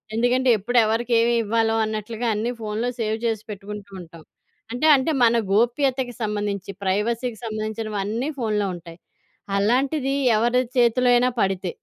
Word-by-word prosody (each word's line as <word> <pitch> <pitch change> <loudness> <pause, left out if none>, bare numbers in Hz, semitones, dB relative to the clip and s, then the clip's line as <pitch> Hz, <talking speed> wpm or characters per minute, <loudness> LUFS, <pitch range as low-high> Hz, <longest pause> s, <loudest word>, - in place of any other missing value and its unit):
ఎందుకంటే 250 +2 +2
ఎప్పుడు 245 +5 -1
ఎవరికేమి 230 +1 +2
ఇవ్వాలో 225 +1 +1
అన్నట్లుగా 220 +2 -4
అన్నీ 230 +4 -1
ఫోన్‌లో 220 +3 -2
సేవ్ 220 0 -1
చేసి 220 -2 -1
పెట్టుకుంటూ 205 0 -8
ఉంటాం. 165 -1 -13 0.5
అంటే, 250 +6 +1
అంటే 265 +4 0
మన 235 0 +5 0.2
గోప్యతకు 250 +2 +1
సంబంధించి 205 -2 -3
ప్రైవసీకి 220 +4 -1
సంబంధించినవి 215 -1 -4
అన్నీ 235 +8 -2
ఫోన్‌లో 210 -3 0
ఉంటాయి. 170 0 -12 0.6
అలాంటిది 270 +5 +1 0.2
ఎవరి 240 +3 +2
చేతిలో 245 +1 +3
అయినా 250 +1 +3
పడితే? 190 -2 -1
225 Hz, 130 wpm, -23 LUFS, 210-245 Hz, 0.6 s, మన